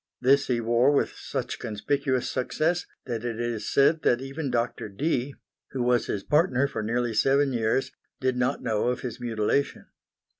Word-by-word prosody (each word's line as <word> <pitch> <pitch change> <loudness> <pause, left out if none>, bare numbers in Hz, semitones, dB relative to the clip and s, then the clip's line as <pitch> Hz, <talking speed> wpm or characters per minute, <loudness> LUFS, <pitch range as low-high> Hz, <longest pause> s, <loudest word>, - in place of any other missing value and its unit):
This 140 +3 +4
he 125 -2 +1
wore 120 +3 +3
with 145 - +1
such - - -4
conspicuous 130 +4 -1
success 160 +7 -1 0.2
that 115 -3 -4
it 115 -2 -3
is 120 -2 -3
said 155 +3 +4
that 120 - +3
even 135 +2 -4
Doctor 120 -3 -2
Dee, 135 +4 -1 0.4
who 130 -2 -1
was 120 0 +2
his 100 - -3
partner 150 -4 +2
for 140 - -4
nearly 120 +2 -1
seven 135 +4 +3
years, 115 +3 0 0.3
did 130 -1 0
not 125 0 0
know 110 -1 0
of 125 0 -1
his 125 -1 -6
mutilation. 120 +4 -1
125 Hz, 165 wpm, -26 LUFS, 115-140 Hz, 0.4 s, This